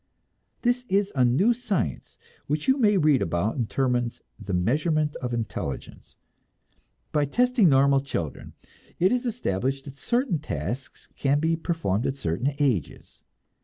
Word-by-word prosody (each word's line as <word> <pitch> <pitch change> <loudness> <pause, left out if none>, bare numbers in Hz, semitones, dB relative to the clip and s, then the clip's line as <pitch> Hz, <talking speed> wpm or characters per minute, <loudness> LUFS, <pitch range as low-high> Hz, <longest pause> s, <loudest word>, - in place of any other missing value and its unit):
This 245 +1 +2
is 200 +1 +2
a 130 - +3
new 150 - +4
science 210 - -3 0.3
which 150 +1 -2
you 265 - +5
may 210 -4 +4
read 150 -6 +4
about 85 +7 0
in 120 -4 0
Terman's 125 -2 0 0.2
"The 100 - -6
Measurement 150 - +1
of 125 -1 -4
Intelligence." 110 - -5 1.0
By 150 -1 +2
testing 245 - +3
normal 140 0 +5
children, 110 - -5 0.4
it 185 +4 +4
is 250 0 0
established 135 - -2
that 140 -1 -10
certain 240 - 0
tasks 120 - -5
can 140 +1 +1
be 160 +2 +1
performed 160 - -1
at 135 - -1
certain 120 - -1
ages. 125 - -2
140 Hz, 140 wpm, -26 LUFS, 120-185 Hz, 1.0 s, you